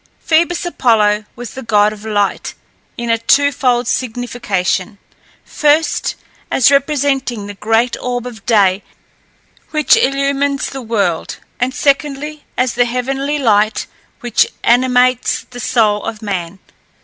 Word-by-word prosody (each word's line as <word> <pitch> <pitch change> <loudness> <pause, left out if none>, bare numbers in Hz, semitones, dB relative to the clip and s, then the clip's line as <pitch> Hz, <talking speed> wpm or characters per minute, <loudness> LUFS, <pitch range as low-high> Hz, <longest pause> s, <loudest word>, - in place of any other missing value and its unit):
Phoebus 340 +2 +1
Apollo 215 -9 +2
was 240 -2 -8
the 265 - -7
god 210 -2 +2
of 210 0 -12
light 205 -2 -1 0.4
in 235 -1 -2
a 230 - +1
twofold 255 -2 +2
signification: 220 -6 -2 0.5
first, 300 0 +1 0.3
as 265 +1 +4
representing 275 -5 0
the 205 - -7
great 225 +4 +1
orb 245 -1 -3
of 230 -5 -9
day 200 -4 +3 0.9
which 305 -3 +3
illumines 275 +1 0
the 270 - -6
world; 205 -8 -1 0.2
and 250 +1 0
secondly, 290 +1 -1
as 255 -1 +1
the 245 0 +2
heavenly 270 +4 -2
light 215 -5 +2 0.4
which 240 -1 +2 0.2
animates 250 0 +2
the 245 - -8
soul 215 -4 +1
of 225 -1 -6
man. 190 -3 -4
245 Hz, 125 wpm, -16 LUFS, 215-275 Hz, 0.9 s, as